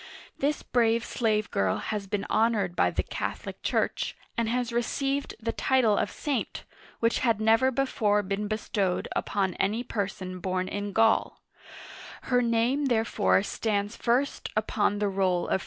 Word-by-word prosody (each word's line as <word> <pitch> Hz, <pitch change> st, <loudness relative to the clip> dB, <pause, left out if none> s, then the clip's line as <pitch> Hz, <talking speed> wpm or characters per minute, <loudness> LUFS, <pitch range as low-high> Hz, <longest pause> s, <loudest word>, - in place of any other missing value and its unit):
This 290 Hz, +2 st, 0 dB
brave 230 Hz, -1 st, +2 dB
slave 215 Hz, -3 st, 0 dB
girl 95 Hz, -1 st, +1 dB
has 210 Hz, -2 st, -4 dB
been 200 Hz, 0 st, -2 dB
honored 215 Hz, -6 st, +1 dB
by -, -, +3 dB
the -, -, -1 dB
Catholic -, -, -5 dB
Church, -, -, -1 dB, 0.2 s
and 230 Hz, -2 st, 0 dB
has 245 Hz, 0 st, -1 dB
received 275 Hz, +4 st, -1 dB
the 230 Hz, 0 st, -2 dB
title 245 Hz, -5 st, +2 dB
of -, -, 0 dB
saint, 285 Hz, -4 st, -3 dB, 0.4 s
which 230 Hz, 0 st, +2 dB
had 230 Hz, -4 st, +2 dB
never 225 Hz, +4 st, +4 dB
before 220 Hz, -6 st, +1 dB
been 200 Hz, +2 st, -2 dB
bestowed 205 Hz, -3 st, -1 dB
upon 195 Hz, -3 st, 0 dB
any 215 Hz, +5 st, +1 dB
person 190 Hz, -5 st, -4 dB
born 185 Hz, 0 st, -1 dB
in 205 Hz, +1 st, -3 dB
GauL 225 Hz, +2 st, +2 dB, 0.8 s
Her 245 Hz, -1 st, +2 dB
name 240 Hz, +4 st, +1 dB
therefore 225 Hz, -5 st, +2 dB
stands 205 Hz, 0 st, -1 dB
first 250 Hz, +4 st, 0 dB
upon 210 Hz, -1 st, +1 dB
the 205 Hz, 0 st, 0 dB
roll 190 Hz, -2 st, +1 dB
of. -, -, +1 dB
220 Hz, 150 wpm, -27 LUFS, 200-235 Hz, 0.8 s, never